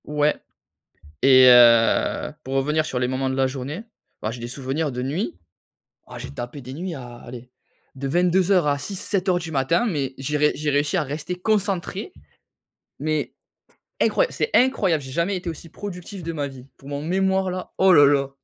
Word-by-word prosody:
Ouais. 150 0 +1 0.9
Et, 130 -1 +7
heu, 120 +1 +5
pour 135 +1 -4
revenir 150 +3 +1
sur 125 - -3
les 125 - +1
moments 130 +1 -1
de 130 - -2
la 135 0 +2
journée, 140 - -5 0.4
bah, 110 - -2
j'ai 120 - -8
des 120 - -5
souvenirs 135 +4 -3
de 125 0 -4
nuit. 150 - -3 0.7
Ah, - - -9
j'ai - - -7
tapé 120 - -7
des 130 +1 -9
nuits 175 +3 -5
à, 120 -4 -9
allez, 125 +1 -11 0.4
de 135 0 -4
22:00 180 +2 +3
à 145 -1 +1
6-7:00 185 +2 -1
du 165 -2 -7
matin 150 - +1
mais, 140 - -2
j'ai 140 +3 -2
ré 150 0 +3
j'ai 150 0 -2
réussi 145 +4 +1
à 175 - +2
rester 150 +5 -4
concentré. 195 -1 -1 0.9
Mais, 155 +1 -2 0.7
incroya - - +3
c'est - - -1
incroyable, 195 - +3
j'ai 130 -1 -9
jamais 170 +6 0
été 180 -1 -4
aussi 165 +1 -10
productif 190 +1 -8
de 165 0 -4
ma 145 -3 -3
vie, 130 -2 -12
pour 135 - -13
mon 145 0 -4
mémoire 190 +3 +1
là, 185 0 -6
oh 190 0 +6
là 145 -4 +8
là! 140 -1 +2
150 Hz, 185 wpm, -23 LUFS, 135-180 Hz, 0.9 s, là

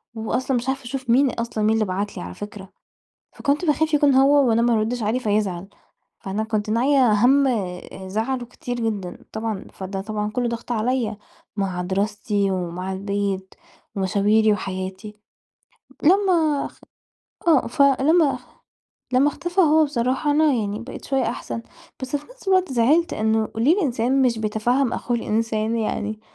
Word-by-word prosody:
وأصلًا 245 +4 -1
مش 240 +2 -4
عارفة 270 0 -2
أشوف 255 0 -6
مين 265 +4 +5
أصلًا، 230 -2 -3
مين 215 +1 +3
اللي 220 -1 +1
بَعَت 200 +2 -3
لي - - -5
على 90 0 -7
فكرة، 205 - -9 0.6
فكنت 290 +5 -1
باخاف 315 0 +1
يكون 290 -1 +4
هو 270 0 +5
وأنا 225 0 +3
ما 240 0 +3
أردّش 225 +2 0
عليه 220 +4 0
فيزعل. 205 -5 -1 0.5
فأنا 200 +3 -2
كنت 215 -1 -2
ناعية 250 +2 +3
همّ 265 +6 +4
آآ 190 -4 -4
زعله 230 +6 -2
كتير 245 0 -6
جدًا 215 -6 -4
طبعًا، 220 -3 -4
فده 190 0 -5
طبعًا 210 0 -3
كلّه 245 +1 -1
ضغط 235 +1 -5
عليَّ، 230 -1 0 0.4
مع 190 -3 -2
دراستي، 200 +1 -1
ومع 180 +1 -3
البيت، 195 -1 -3 0.4
ومشاويري، 205 +3 +3
وحياتي. 190 +1 -5 0.9
لما 335 -4 +3
أخ - - -11 0.7
آه، 310 -6 +4
فلما 280 +4 +3 0.7
لما 260 +3 +4
اختفى 350 +5 -1
هو 315 -2 +5
بصراحة، 265 +1 0
أنا 305 0 +4
يعني 210 -2 -2
بقيت 240 +3 -9
شوية 270 -1 0
أحسن، 230 0 -4 0.4
بس 260 +2 -1
في 290 - -8
نَفس - - -10
الوقت 370 -5 +3
زعلت 285 +8 +3
إنّه 220 0 +1
ليه 250 +9 +4
الإنسان 265 - +1
مش 240 -3 +2
بيتفهّم 230 +4 0
أخوه 240 - -1
الإنسان 225 0 -1
يعني، 215 -1 -2
230 Hz, 155 wpm, -22 LUFS, 210-270 Hz, 0.9 s, مين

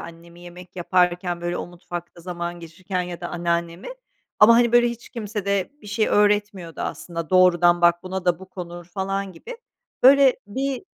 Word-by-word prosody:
annemi 170 +1 -12
yemek 175 +1 -13
yaparken, 180 0 0
böyle, 175 0 -3
o - - -5
mutfakta 175 0 -9
zaman 175 0 -5
geçirirken 180 +3 -5
ya 175 -1 -7
da 175 - -5
anneannemi. 170 0 -3 0.5
Ama, 225 +2 +8
hani, 235 0 +3
böyle, 240 0 +5
hiç 235 0 -8
kimse 215 -4 -5
de 200 -2 -1
bir - - -13
şey 215 +1 0
öğretmiyordu 205 -4 +1
aslında, 165 -2 -5
doğrudan 175 -1 +4
bak 175 0 +3
buna 185 0 -5
da 175 -2 +2
bu 190 - -12
konur 175 -2 -8
falan 195 +2 -4
gibi. 465 - -10 0.5
Böyle 270 0 +6
bir 265 - -3
180 Hz, 170 wpm, -23 LUFS, 175-205 Hz, 0.5 s, Ama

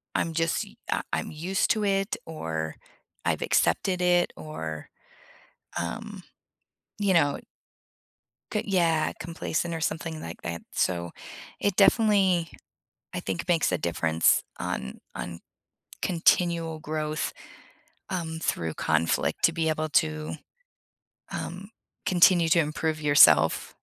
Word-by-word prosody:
I'm 165 - 0
just 165 0 0
u - - -14 0.2
um, - - 0
I - - +2
I'm - - -5
used 175 +5 -1
to 215 -2 +1
it, 195 +3 +1
or 80 - -4 0.5
I've - - 0
accepted 185 -2 +1
it, 175 0 +3
or, 80 0 -6 0.9
um, - - -5 0.8
you 200 -2 +2
know 145 -4 +3 1.1
c 210 - 0
yeah, 165 -5 +2
complacent, 170 0 -3
or 165 - -4
something 160 0 -3
like - - -8
that, 85 0 -4
so, 85 -1 -1 0.5
it 200 -2 +1
definitely, 195 -5 +4 0.6
I - - -2
think, 95 -2 -4
makes 165 - +2
a 90 - +1
difference 80 -1 +2 0.2
on 65 - -4 0.2
on 85 -1 -6 0.6
continual 170 -2 +2
growth, 155 0 -2 0.8
um, 160 -3 -3
through 80 - -1
conflict 80 +1 0
to - - +4
be 165 -1 0
able 155 0 -1
to, 155 +1 0 1.0
um, 190 +3 -5 0.4
continue 175 -2 +5
to 170 - +5
improve 155 0 -1
yourself. 85 - +5
160 Hz, 120 wpm, -27 LUFS, -, 1.1 s, continue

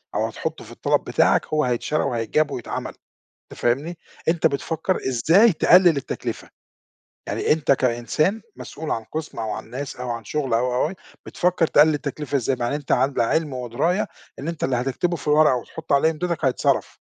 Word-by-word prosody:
أو - - +1
هتحطُّه - - -5
في - - -13
الطلب - - 0
بتاعك، - - +2
هو 155 0 +1
هيتشرى 125 +5 0
وهيتجاب 130 +4 0
ويتعمَل، 120 - -5 0.6
أنت - - -11
فاهمني؟ 145 +8 0 0.3
أنت 165 0 +3
بتفكّر 160 +5 -2
إزاي 165 - +4
تقلِّل 175 0 +5
التكلفة، 140 - -5 0.8
يعني - - +1
أنت 150 -2 +2
كإنسان 135 - 0
مسؤول 155 0 -7
عن 115 - -2
قسم 155 +6 -6
أو 110 -1 -2
عن 105 - -6
ناس 135 +3 -5
أو 125 -1 -5
عن 115 -1 -4
شغل، 135 0 -1
أو، 125 +2 +1
أو، 125 - +2
أو 190 - -7 0.3
بتفكّر 180 -1 +1
تقلّل 155 0 +5
التكلفة 145 0 -3
إزاي 135 0 0
مع 120 -1 -1
إن - - -2
أنت 145 -1 -3
على 130 +1 +2
علم 150 +5 0
ودراية 130 - -1 0.3
إن 145 - -5
أنت 165 -2 -3
اللي 130 -1 +1
هتكتبه 135 +8 -1
في 155 - -12
الورقة 150 -2 +5
وتحُط 125 - -6
عليهم 140 +3 +4
إمضِتك 170 0 -3
هيتصرف، 130 -2 0
145 Hz, 180 wpm, -23 LUFS, 125-160 Hz, 0.8 s, تقلِّل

